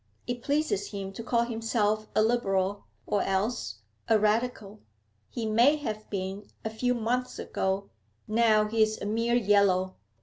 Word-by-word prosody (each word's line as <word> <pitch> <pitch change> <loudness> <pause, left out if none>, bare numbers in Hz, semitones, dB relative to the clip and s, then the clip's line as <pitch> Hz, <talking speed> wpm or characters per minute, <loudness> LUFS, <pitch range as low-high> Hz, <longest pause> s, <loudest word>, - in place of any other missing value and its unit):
It 245 0 -4
pleases 285 -8 0
him 195 -2 -6
to 210 - -6
call 235 0 +2
himself 225 -2 0
a 215 - +5
Liberal, 200 -4 0 0.2
or 205 - +1
else 195 - -1 0.3
a 225 - +5
Radical. 215 -1 0 0.5
He 230 - -4
may 235 +7 +4
have 215 -8 -5
been 195 +1 -4 0.2
a 220 - -2
few 245 +3 0
months 245 +2 -1
ago; 190 +1 -2 0.4
now 215 -1 +4
he's 220 0 +1
a - - -5
mere 230 +3 +1
Yellow. 200 -4 +3
215 Hz, 145 wpm, -28 LUFS, 200-235 Hz, 0.5 s, a